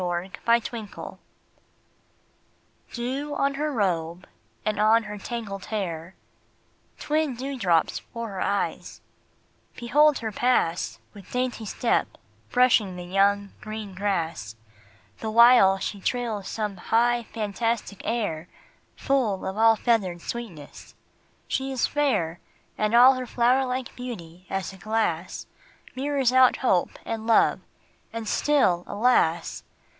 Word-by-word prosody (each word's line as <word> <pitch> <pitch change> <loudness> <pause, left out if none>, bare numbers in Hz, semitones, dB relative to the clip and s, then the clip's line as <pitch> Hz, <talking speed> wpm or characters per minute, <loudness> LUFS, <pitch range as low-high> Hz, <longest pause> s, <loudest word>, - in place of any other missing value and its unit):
MY 175 +1 -2 0.2
LADY 235 0 +2
APRIL 210 -2 -9 1.7
Dew 265 +5 -3
on 275 0 +1
her 300 +2 -2
robe 180 - -1 0.4
and 215 -1 -1
on 220 +2 +4
her 210 -1 -7
tangled 200 -4 -6
hair; 180 -4 -4 0.8
Twin 305 -3 -1
dewdrops 235 - 0
for 230 -1 -7
her 195 -2 -5
eyes; 200 - -2 0.8
behold 295 +5 +3
her 220 -1 -4
pass, 200 -7 0 0.2
With 200 -3 -14
dainty 250 -3 -2
step 235 - 0 0.3
brushing 240 -7 +3
the 180 - -7
young, 200 +2 +1
green 215 -2 -7
grass, 165 - -2 0.6
The 220 - -3
while 235 -4 +7
she 195 +1 -5
trills 225 -4 -2
some 210 -3 -3
high, 235 +5 +1
fantastic 220 -1 -2
air, 180 -9 -2 0.5
Full 245 -9 0
of 190 - -3
all 225 +1 +5
feathered 205 -6 0
sweetness: 200 -12 -8 0.5
she 270 0 -2
is 260 -3 +1
fair, 180 - 0 0.4
And 215 +2 0
all 250 +3 +8
her 255 -1 -5
flower 250 +3 +2
like 250 0 -4
beauty, 185 -8 -8
as 195 -1 -3
a - - -12
glass, 190 -5 -2 0.5
Mirrors 270 -2 0
out 260 -1 +6
hope 185 -9 +1
and 225 0 -4
love: 230 - +4 0.5
and 230 -1 -5
still, 235 -14 +2
alas! 205 -7 +1
220 Hz, 120 wpm, -25 LUFS, 190-245 Hz, 1.7 s, all